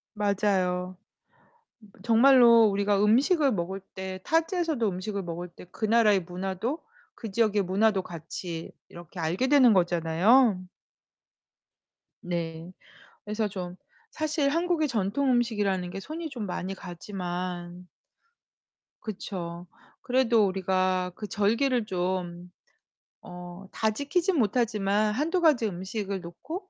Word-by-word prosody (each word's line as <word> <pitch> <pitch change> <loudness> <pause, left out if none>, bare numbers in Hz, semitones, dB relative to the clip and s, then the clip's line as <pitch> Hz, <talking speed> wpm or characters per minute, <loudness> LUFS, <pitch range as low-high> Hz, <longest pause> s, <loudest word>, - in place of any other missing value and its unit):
맞아요. 185 -3 0 1.1
정말로 235 0 +6
우리가 200 0 +1
음식을 275 - +3
먹을 190 +1 -3
때 190 0 -8
타지에서도 325 - 0
음식을 195 +2 -4
먹을 175 +1 -5
때 175 - -14
그 220 - -3
나라의 215 -3 +4
문화도 190 - -4 0.4
그 225 -4 -7
지역의 215 -1 +2
문화도 195 +2 +2
같이 165 -1 -7 0.2
이렇게 175 +1 -11
알게 175 +11 0
되는 265 -4 +6
거잖아요. 180 +6 +3 1.6
네. 170 -1 -4 0.5
그래서 210 +1 -2
좀 180 -2 -6 0.3
사실 305 -2 0
한국의 335 0 +1
전통 240 +4 0
음식이라는 205 -7 0
게 195 - -6
손이 315 - -6
좀 240 -6 -5
많이 185 +1 -4
가지만 180 -1 -6 1.1
그쵸. 180 -4 -6 0.3
그래도 245 -4 +3
우리가 185 -1 0
그 210 - -7
절기를 230 +4 +1
좀 180 -2 -3 0.7
어 180 0 -9 0.2
다 220 - +1
지키진 330 - 0
못하지만 210 -2 +1
1-2 325 - 0
가지 300 -9 +4
음식을 195 +1 -4
놓고 320 - -8
200 Hz, 245 characters per minute, -27 LUFS, 180-240 Hz, 1.6 s, 정말로